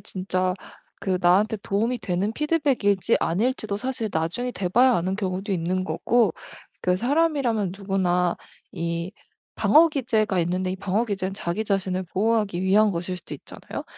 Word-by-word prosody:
진짜 185 -1 -2 0.5
그 185 -2 0
나한테 200 +5 +3
도움이 230 +5 0
되는 195 +1 -1
피드백일지 275 - +1
아닐지도 215 +2 0
사실 240 -1 -3
나중에 170 +11 -1
돼 185 -2 -2
봐야 250 +6 +5
아는 185 +1 0
경우도 195 0 -2
있는 185 +1 -1
거고 215 +8 +2 0.5
그 180 0 +1
사람이라면 255 - +1
누구나 180 -3 0 0.4
이 170 +1 -3 0.4
방어 330 +2 +5
기제가 220 - 0
있는데 185 +2 -1
이 190 - -4
방어 200 +4 0
기제는 195 -3 -3
자기 185 +4 -3
자신을 190 -2 -1
보호하기 210 -3 +1
위한 205 +3 +4
것일 180 +1 -3
수도 180 - -9
있잖아요. - - -8
195 Hz, 345 characters per minute, -24 LUFS, 185-225 Hz, 0.5 s, 봐야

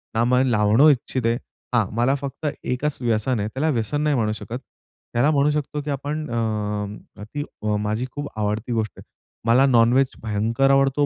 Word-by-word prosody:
ना 115 - +3
मला 125 +1 +3
लावणं 110 +6 +5
इच्छित 130 -2 -2
आहे. 115 +1 +2 0.4
हां. 115 -4 +4
मला 120 +4 +2
फक्त 140 +2 -6 0.2
एकच 140 +4 -1
व्यसन 115 +1 +1
आहे. 105 - -1
त्याला 140 +7 -1
व्यसन 130 +2 0
नाही 150 -1 +2
म्हणू 110 -4 +1
शकत. 115 +3 -6 0.5
त्याला 120 +6 +3
म्हणू 145 0 +3
शकतो, 150 0 -2
की 145 - -6
आपण 145 +3 -3
अ, - - -4 0.9
अ, - - -6
ती 145 +7 -5 0.4
माझी 105 +4 -1
खूप 145 0 -4
आवडती 105 +3 -1
गोष्ट 110 -2 -1
आहे. - - -11 0.4
मला 125 +4 +5
नॉनवेज 125 +1 +4 0.2
भयंकर 115 +5 +1
आवडतो, 135 +1 +3
125 Hz, 180 wpm, -23 LUFS, 115-140 Hz, 0.9 s, लावणं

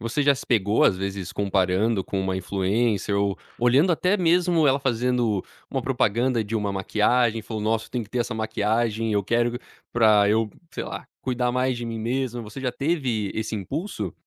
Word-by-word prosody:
você 115 +6 -1
já 140 0 +5
se 130 - -8
pegou 105 -2 +2
às 95 - +4
vezes 95 -2 -4
comparando 100 +2 +1
com 95 +2 -3
uma 95 -1 -1
influencer 100 +3 0
ou 100 -1 0 0.2
olhando 135 +9 +4
até 180 +5 +2
mesmo 175 -2 +3
ela 135 0 +3
fazendo 120 -5 0 0.3
um - - -1
propaganda 120 +2 +1
de 110 +2 -3
uma 105 -2 -1
maquiagem, 110 +4 +1
falou: 110 0 -5
"Nossa, 110 +1 0
tem 125 - -3
que 105 - -13
ter 125 - -2
essa 120 0 -1
maquiagem, 110 +1 0
eu 100 -1 +2
quero 120 +4 +1 0.4
pra 105 -3 +5
eu, 110 +1 +2 0.2
sei - - -4
lá, - - -7 0.2
cuidar 125 -1 0
mais 125 0 +1
de 120 0 -5
mim 115 -1 -4
mesma.", 120 +1 -2
você 110 +5 -9
já 125 -2 -1
teve 130 - -1
esse 110 0 -3
impulso? 110 - -4
115 Hz, 185 wpm, -24 LUFS, 105-125 Hz, 0.4 s, já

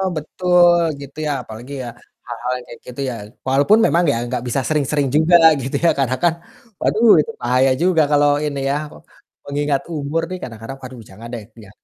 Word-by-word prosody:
betul 175 +2 +3 0.2
gitu 140 +2 -11
ya - - 0
apalagi 120 +6 -10
ya - - -5 0.4
hal-hal 120 +1 -4
yang 125 - -13
kayak 120 - -11
gitu 125 +2 -7
ya, 120 - -5 0.3
walaupun 145 +12 +4
memang 170 +1 +2
ya 115 - -1
enggak 120 - -4
bisa 130 +3 0
sering-sering 145 -2 0
juga 165 +3 +5 0.2
gitu 130 - -4
ya - - +6
karena 130 -1 +1
kan, 170 -1 +4 0.5
waduh, 230 +2 +2
itu 230 - -6
bahaya 130 +2 +2
juga 175 -3 +3
kalau 145 0 +4 0.2
ini 140 -2 -3
ya, 140 - 0 0.7
mengingat 145 -1 -1
umur 150 +2 -2
nih 185 - -4
kadang-kadang, 115 +2 -8
waduh, 130 -1 -10
jangan 110 +5 -11
deh, 115 -3 -5 0.2
ya 95 - -15
140 Hz, 180 wpm, -19 LUFS, 125-160 Hz, 0.7 s, ya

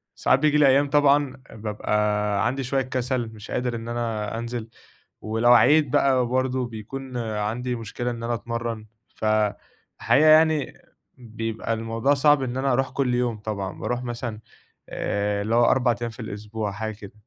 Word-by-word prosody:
ساعات - - +3
بييجي 150 0 +3
لي 150 -2 +6
أيام 140 +2 +4
طبعًا 145 -2 +3
بابقى 105 -1 -1
عندي 135 +2 -2
شوية 135 +2 0
كسل، 125 -2 -2
مش 110 0 -11
قادر 125 -1 -1
إن 115 0 -6
أنا 115 -2 -3
أنزل 115 -1 -5 0.5
ولو 115 +3 +2
عِييت 150 +4 +5
بقى 130 -2 +3
برضه 130 +1 0
بيكون 125 +4 -7
عندي 115 +2 -2
مشكلة 120 +2 -4
إن 115 -1 -6
أنا 120 +1 -1
أتمرن، 115 -1 -4 0.3
فَالحقيقة 110 +7 0
يعني 155 -2 +4 0.4
بيبقى 115 -1 -4
الموضوع 115 +4 0
صعب 145 0 +4
إن 125 -1 -3
أنا 135 +1 +1
أروح 135 +2 +1
كل 130 -3 0
يوم 120 -2 0
طبعًا، 100 -3 -5
باروح 125 0 -2
مثلًا 120 -2 -5 0.5
آآ 100 0 -1
اللي 110 +3 -1
هو 120 0 +5
4 120 -1 +3
أيام 120 0 -3
في 115 +3 -12
الأسبوع، 105 -1 -5
حاجة 110 +2 -4
كده. 100 -2 -11
120 Hz, 160 wpm, -24 LUFS, 110-130 Hz, 0.5 s, لي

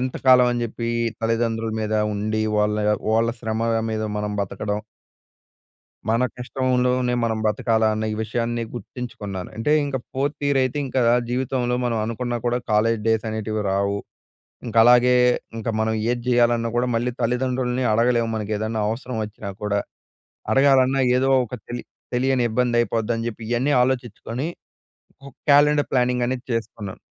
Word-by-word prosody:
ఎంత 130 0 -2
కాలం 125 -1 +7
అని 120 0 -2
చెప్పి 115 +1 -4 0.3
తల్లిదండ్రుల 115 -1 0
మీద 110 0 -1 0.2
ఉండి 110 +1 -1 0.2
వాళ్ళ 105 0 +2 0.4
వాళ్ళ 115 +1 +3
శ్రమగా 115 0 0
మీద 110 0 -2
మనం 105 0 -2
బతకడం. 105 +2 -3 1.3
మన 115 +3 +2
కష్టంలోనే 125 -1 0
మనం 110 -1 0
బ్రతకాలా 110 +1 +2
అన్న 110 0 -2
ఈ - - -2
విషయాన్ని 115 +1 -2
గుర్తించుకున్నాను. 105 -6 -6
అంటే 130 +7 +1
ఇంక 140 -2 -2 0.2
4థ్ 145 +2 -2
ఇయర్ 140 -1 +2
అయితే 130 +3 -1
ఇంకా 130 0 0 0.3
జీవితంలో 125 -1 0
మనం 115 -2 0
అనుకున్నా 120 +2 -3
కూడా 120 +1 +1
కాలేజ్ 110 +1 +2
డేస్ 110 -1 +2
అనేటివి 110 -1 -2
రావు. 100 +1 0 0.7
ఇంకా 115 0 +2
అలాగే 125 +1 +6 0.4
ఇంకా 115 +1 -2
మనం 110 0 +1 0.2
ఏది 120 -1 -2
చేయాలన్నా 120 -1 +3
కూడా 125 +1 +1
మళ్ళీ 120 +2 0
తల్లిదండ్రుల్ని 125 +1 0
అడగలేము. 115 0 +2
మనకు 110 0 -4
ఏదైనా 110 0 -2
అవసరం 120 +1 -4
వచ్చినా 105 -1 -7
కూడా. 100 -1 +1 0.7
అడగాలన్నా 135 -1 +4 0.2
ఏదో 135 +1 +2 0.2
ఒక 125 - -8
తెలి 120 0 -5 0.3
తెలియని 130 0 +2
ఇబ్బంది 120 +1 +1
అయిపోద్ధి 115 -1 0
అని 115 +1 -3
చెప్పి 115 0 -8
ఇయ్యన్నీ 125 +5 +1
ఆలోచించుకొని 125 +2 -2 0.8
ఒక 140 - -11 0.2
క్యాలెండర్ 145 +1 +5
ప్లానింగ్ 125 -1 +2
అనేది 125 0 -3
చేసుకున్నా. 110 -3 -4
120 Hz, 145 wpm, -23 LUFS, 110-125 Hz, 1.3 s, కాలం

